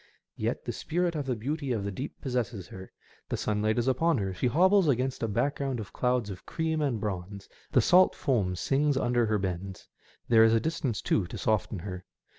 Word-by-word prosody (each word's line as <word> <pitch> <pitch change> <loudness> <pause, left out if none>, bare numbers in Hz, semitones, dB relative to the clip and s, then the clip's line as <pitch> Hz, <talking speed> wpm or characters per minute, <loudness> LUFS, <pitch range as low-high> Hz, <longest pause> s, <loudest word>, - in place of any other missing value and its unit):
Yet - - -2
the - - -2
spirit 175 +2 -1
of 145 -4 -3
the 125 - 0
beauty 140 +5 -3
of 110 -4 -1
the 100 - -3
deep 130 +9 -6
possesses 120 - -3
her; 95 0 -10 0.4
the - - -1
sunlight 110 +1 0
is 120 +1 +1
upon 160 +5 +2
her; 95 -3 -2
she 95 - 0
hobbles 185 - +4
against 130 -1 0
a 115 - 0
back 140 +7 0
groimd 135 -3 -2
of 105 -4 -8
clouds 125 -4 0
of 95 - -9
cream 160 -1 -2
and 135 -7 0
bronze, 100 -1 -5 0.2
the - - +5
salt 185 +1 +5
foam 105 - 0
pings 140 +8 +1
under 120 -3 +2
her 105 0 +1
bends, 95 0 -4 0.4
there 115 -2 +6
is 115 0 +5
distance, 145 -6 -2
too, 95 -5 +1
to - - -7
soften 110 -1 0
her. 90 0 -6
120 Hz, 205 wpm, -28 LUFS, 100-140 Hz, 0.4 s, there